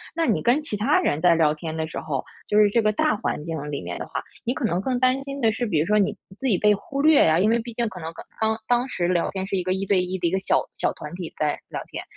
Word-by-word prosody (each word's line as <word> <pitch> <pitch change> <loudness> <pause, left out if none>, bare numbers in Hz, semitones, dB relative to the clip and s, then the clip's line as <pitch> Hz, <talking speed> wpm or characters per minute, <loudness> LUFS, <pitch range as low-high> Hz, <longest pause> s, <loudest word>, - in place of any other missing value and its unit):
那 330 - +1
你 - - +2
跟 250 +6 +3
其 215 -9 -3
他 210 - +3
人 145 - 0
在 175 -1 +6
聊 155 -2 +3
天 160 0 -5
的 160 0 -2
时 - - -5
候， 145 -4 -3 0.2
就 210 - +3
是 210 - +6
这 230 +3 +2
个 215 - +3
大 305 +4 +1
环 150 - -3
境 150 -3 -4
里 140 - -3
面 85 0 -5
的 - - -4
话， - - -4 0.2
你 245 - 0
可 - - -5
能 180 -3 0
更 250 +2 -1
担 255 +1 +2
心 275 0 -6
的 225 -2 +4
是， 240 +3 -2
比 165 -8 +1
如 155 - +2
说 210 - +3
你 200 - +1 0.2
自 265 - -1
己 205 -8 +3
被 210 +2 +4
忽 275 +8 -4
略 310 - +6
啊， 160 +1 +4
因 210 +3 +3
为 235 +1 +3
毕 235 0 -6
竟 235 0 -1
可 180 - -9
能 160 0 -5 0.3
刚 220 0 +1
当 245 +1 +2
时 175 -6 -1
聊 175 -2 +1
天 190 -1 -3
是 195 - -2
一 180 - -1
个 185 +1 0
1 190 +1 -2
对 190 -2 +3
1 185 +1 -3
的 170 - +1
一 - - -1
个 190 - +1
小 - - +2 0.2
小 - - +1
团 150 +2 -9
体 175 -3 -6
在 150 -1 0
聊 - - -4
天， - - -5
195 Hz, 325 characters per minute, -24 LUFS, 165-235 Hz, 0.3 s, 在